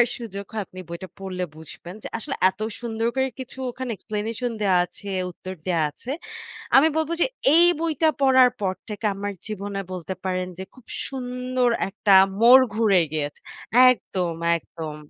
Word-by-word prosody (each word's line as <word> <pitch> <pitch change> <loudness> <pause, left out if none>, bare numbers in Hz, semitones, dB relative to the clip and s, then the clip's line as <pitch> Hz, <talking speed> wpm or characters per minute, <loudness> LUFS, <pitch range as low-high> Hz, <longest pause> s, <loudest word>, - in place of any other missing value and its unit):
আপনার 240 - +5
সুযোগ 200 -4 -6
হয় 215 -2 -2
আপনি 185 - -10
বইটা 170 +2 -7
পড়লে 185 -2 -4
বুঝবেন 160 +3 -11
যে - - -5
আসলে 275 +4 -4 0.2
এত 190 - -24 0.2
সুন্দর 230 -1 -1
করে 265 0 +2
কিছু 260 0 -9
ওখানে 255 0 -5
explanation 225 +4 -3
দেয়া 190 -3 +3
আছে, 195 +3 -10 0.2
উত্তর 185 +2 -8
দেওয়া 170 -3 +1
আছে। 235 - -10 0.7
আমি 295 +4 +7
বলব 320 0 0
যে, - - +5 0.3
"এই 345 +1 +7
বইটা 320 -1 +1
পড়ার 260 -2 +6
পর 190 -2 0
থেকে 210 +1 -7
আমার 200 +1 -4
জীবনে 200 -1 -4
বলতে 185 +1 -5
পারেন 185 -1 -1
যে 190 - -5
খুব 255 -3 -17 0.2
সুন্দর 250 -1 -1 0.2
একটা 200 0 +3 0.3
মোড় 255 +3 +9
ঘুরে 215 -5 +4
গিয়েছ" 145 -2 -2 0.6
একদম, 180 -8 -2 0.2
একদম! 160 -2 -7
210 Hz, 165 wpm, -24 LUFS, 185-250 Hz, 0.7 s, মোড়